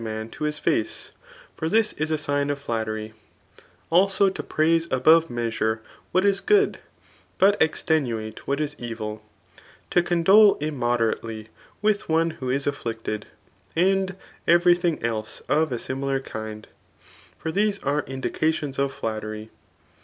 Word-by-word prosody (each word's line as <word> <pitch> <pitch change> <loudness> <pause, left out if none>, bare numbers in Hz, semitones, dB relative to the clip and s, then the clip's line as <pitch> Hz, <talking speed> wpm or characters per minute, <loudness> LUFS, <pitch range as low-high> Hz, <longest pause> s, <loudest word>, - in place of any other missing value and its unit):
man 110 0 -4
to 150 - -5
his 150 0 -1
face; 110 - -1 0.4
for 160 - -2
this 220 +2 +3
is 155 +1 -2
a 155 - +1
sign 145 -1 -1
of 145 - -1
flattery; 110 -4 -3 0.8
idso 195 +2 +4
to - - -4
praise 165 +1 +1
above 160 +5 +5
measure 115 -2 -1 0.3
what 185 +2 +2
is 195 -1 +2
|;ood» 415 -1 +4 0.6
but 200 +2 +5
extenuate 125 -9 0
what 140 +1 0
is 150 -1 -1
evil^ 110 -3 -5 0.7
to 175 - +4
condole 190 +5 +5
immoderately 120 -6 -1 0.3
with 210 -3 +1
one 165 +1 +2
who 145 -6 -6
is 135 +2 0
aflKct« 115 -6 -4
ed; 105 -1 -3 0.5
and 190 +2 +2 0.3
every 175 +1 +6
thing 175 -2 0
else 110 -2 -3
of 155 -1 +2
a 120 - -1
similar 135 +2 -2
kind; 110 -4 -7 0.7
for 160 - -4
these 205 +2 +1
are 145 +2 +1
indications 140 +2 -2
of 140 0 +1
flattery. 110 -2 -5
145 Hz, 140 wpm, -24 LUFS, 115-170 Hz, 0.8 s, every